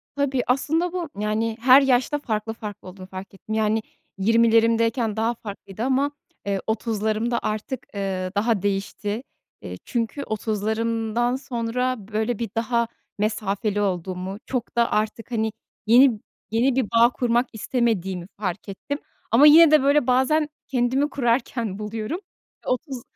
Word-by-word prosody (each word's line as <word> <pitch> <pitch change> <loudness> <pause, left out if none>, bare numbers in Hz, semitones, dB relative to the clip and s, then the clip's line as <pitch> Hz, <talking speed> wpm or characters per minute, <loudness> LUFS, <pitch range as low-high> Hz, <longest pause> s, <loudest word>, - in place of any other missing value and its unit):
Tabii, 280 -2 +1
aslında 320 +7 +1
bu, 350 -4 -3
yani, 220 +2 -1
her 260 +3 +8
yaşta 270 +2 +2
farklı 225 -4 -3
farklı 210 -3 -8
olduğunu 185 0 -10
fark 190 +1 -9
ettim, 215 +3 -6
yani, 220 0 +1 0.4
20'lerimdeyken 230 +1 +3
daha 225 +2 +1
farklıydı 205 -1 -7
ama, 270 +3 +1 0.3
eee, 200 -1 0
30'larımda 220 +1 0
artık, 215 +4 -3
eee, 190 -2 -2
daha 215 -1 +1
değişti, 205 +3 -2 0.4
eee, - - -7
çünkü 240 +3 -2
30'larımdan 225 +2 -1
sonra, 250 -1 -2 0.2
böyle, 220 +1 0
bir 230 -3 -2
daha 235 +1 +1 0.3
mesafeli 210 0 -1
olduğumu, 185 0 -2
çok 250 -2 -4
da 235 - +3
artık, 215 +3 -1
hani, 220 -2 0 0.4
yeni 240 -1 +6 0.3
yeni 240 +3 +2
bir 265 - +2
bağ 230 +3 +4
kurmak 245 0 +1
istemediğimi 195 -6 -1
fark 195 0 -4
ettim. 280 +9 -4 0.3
Ama 265 +7 +7
yine 320 +1 +8
de, 305 -3 +6
böyle, 285 -1 +3
bazen 265 +5 +3 0.2
kendimi 260 +3 +1
kurarken 235 -5 -1
buluyorum. 215 - -4 0.5
30 255 0 -2
230 Hz, 135 wpm, -24 LUFS, 210-255 Hz, 0.5 s, her